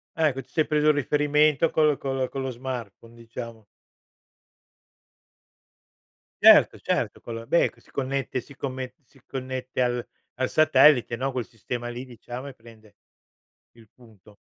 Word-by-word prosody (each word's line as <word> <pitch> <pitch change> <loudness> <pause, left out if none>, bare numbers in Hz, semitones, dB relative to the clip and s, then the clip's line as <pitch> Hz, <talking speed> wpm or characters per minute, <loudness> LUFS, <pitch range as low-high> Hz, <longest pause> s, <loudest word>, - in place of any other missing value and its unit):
Ecco, 150 -5 +1
ti 125 - -23
sei 155 - +1
preso 150 0 +2
il - - +6
riferimento 150 +2 +2
col 150 -2 +2
con 135 -1 -3
lo 130 -1 0
con 135 - -5
lo 130 - -3
smartphone, 120 -3 -7
diciamo. 115 -1 -9 2.8
Certo, - - +7
certo, - - -1
quello 115 0 -8
beh, 170 - +3
che - - -24
si - - -25
connette 135 -1 -2
si 140 - -16
comme 130 -2 -5
si 135 +2 -24
connette 130 -1 -4
al 120 -1 0 0.3
al 130 - 0
satellite, 150 -6 +5
no, 135 +3 -2
quel 125 -3 -4
sistema 120 +1 -6
lì 120 +2 -6
diciamo, 125 +1 -9
e 140 - -8
prende 110 -3 -18 0.8
il 115 -2 -19
punto. 110 -4 -20
130 Hz, 150 wpm, -25 LUFS, 120-140 Hz, 2.8 s, Certo